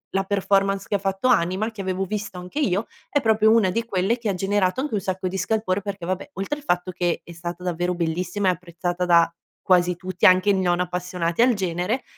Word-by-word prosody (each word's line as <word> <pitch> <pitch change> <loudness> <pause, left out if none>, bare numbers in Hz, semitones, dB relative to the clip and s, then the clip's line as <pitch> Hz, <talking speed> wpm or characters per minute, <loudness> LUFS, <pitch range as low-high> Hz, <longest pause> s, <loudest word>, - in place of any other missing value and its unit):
la 195 0 +1
performance 195 0 +1
che - - -4
ha 200 - +2
fatto 195 +4 -1
Anima, 190 0 +2
che 220 -3 -7
avevo 190 0 -2
visto 205 -1 -4
anche 180 +10 -5
io, 210 -6 +1 0.2
è 290 - +2
proprio 220 -3 +3
una 220 -4 +4
di 230 +5 -1
quelle 220 +1 0
che 230 -2 -2
ha 195 - 0
generato 195 +2 0
anche 290 0 -2
un 210 - +1
sacco 190 -1 -3
di 190 +1 -3
scalpore, 205 -1 0
perché 195 -3 -5
vabbè, 185 +8 -3
oltre 195 +10 -3
il - - -16
fatto 180 -7 0
che 175 -1 -1
è - - -12
stata 170 +1 -7
davvero 180 0 -1
bellissima 180 +3 -1
e - - +5
apprezzata 175 0 -3
da 170 -1 +5 0.3
quasi 180 -1 +3
tutti, 180 +1 +1
anche 185 +2 +5
i - - +5
non 180 -2 +1
appassionati 180 0 -2
al 245 -1 +5
genere, 185 +5 -1
185 Hz, 220 wpm, -23 LUFS, 180-205 Hz, 0.3 s, e